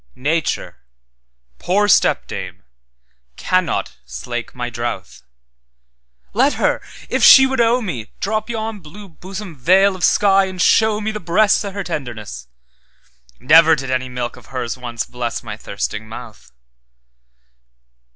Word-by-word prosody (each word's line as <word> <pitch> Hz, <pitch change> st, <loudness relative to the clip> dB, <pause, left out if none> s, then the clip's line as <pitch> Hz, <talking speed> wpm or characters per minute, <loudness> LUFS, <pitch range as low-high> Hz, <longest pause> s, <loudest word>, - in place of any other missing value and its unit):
Nature, 155 Hz, +4 st, -2 dB, 0.8 s
poor 205 Hz, +3 st, +1 dB
stepdame, 205 Hz, -, +1 dB, 0.7 s
cannot 185 Hz, -, -1 dB
slake 120 Hz, -, -6 dB
my 125 Hz, -1 st, -4 dB
drouth; 115 Hz, -, -5 dB, 1.1 s
Let 270 Hz, +6 st, +3 dB
her, -, -, 0 dB, 0.3 s
if -, -, -1 dB
she 265 Hz, -, +9 dB
would 265 Hz, -2 st, 0 dB
owe 235 Hz, +2 st, +3 dB
me, 125 Hz, -, -5 dB
Drop 215 Hz, +2 st, -2 dB
yon 220 Hz, -2 st, -4 dB
blue 190 Hz, +5 st, -12 dB
bosom 190 Hz, +1 st, -9 dB
veil 190 Hz, +8 st, +3 dB
of 185 Hz, -, -8 dB
sky, 195 Hz, -1 st, +4 dB
and 185 Hz, -1 st, -7 dB
show 220 Hz, +3 st, +3 dB
meThe 215 Hz, -2 st, -4 dB
breasts 195 Hz, +6 st, +3 dB
o' 200 Hz, -, -4 dB
her 200 Hz, 0 st, -4 dB
tenderness:Never 70 Hz, -, -1 dB
did 135 Hz, -3 st, -5 dB
any 130 Hz, 0 st, -1 dB
milk 125 Hz, -1 st, -5 dB
of -, -, -16 dB
hers 125 Hz, -3 st, -4 dB
once 120 Hz, -3 st, -5 dB
blessMy 120 Hz, -3 st, -5 dB
thirsting 105 Hz, +1 st, -5 dB
mouth. 115 Hz, -, -11 dB
155 Hz, 120 wpm, -19 LUFS, -, 1.1 s, she